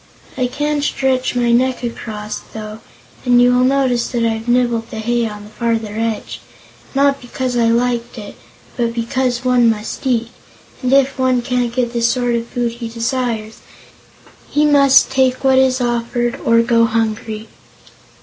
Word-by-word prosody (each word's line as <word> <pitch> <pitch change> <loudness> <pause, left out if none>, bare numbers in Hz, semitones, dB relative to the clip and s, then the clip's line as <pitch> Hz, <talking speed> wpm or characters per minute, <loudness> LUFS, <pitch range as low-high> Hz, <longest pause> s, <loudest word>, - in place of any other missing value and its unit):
I 255 -1 0
can 295 +3 -2
stretch 265 -3 0
my 240 -1 +2
neck 255 +1 +1
across, 215 -3 -5
though, 215 0 -7 0.4
and 245 -1 +4
you 245 0 +5
will 250 - +3
notice 255 -2 +1
that 235 -2 -1
I've 225 0 -2
nibbled 240 -2 +1
the 220 - -7
hay 235 +1 0
on 210 -1 -8
the 210 - -13
farther 225 -2 -2
edge 225 -1 -3 0.5
not 275 0 +2
because 250 0 -4
I 235 -1 +2
liked 240 +1 0
it, 205 -2 -8 0.4
but 235 -1 -1
because 245 +1 -1
one 245 -2 +4
must 220 +4 -3
eat, 235 -2 0 0.5
and 255 -1 -1
if 270 -1 +3
one 255 -2 +2
can't 245 -1 -1
get 240 -1 -1
the 235 - -1
sort 240 +1 +1
of 235 0 -2
food 240 -1 -2
he 235 0 -7
desires, 230 -1 -3 0.9
he 300 +1 +2
must 280 -3 +5
take 260 -1 +1
what 265 -1 +4
is 260 0 +2
offered 240 0 -1
or 230 0 +4
go 230 0 +3
hungry." 220 -1 -2
240 Hz, 165 wpm, -17 LUFS, 230-255 Hz, 0.9 s, you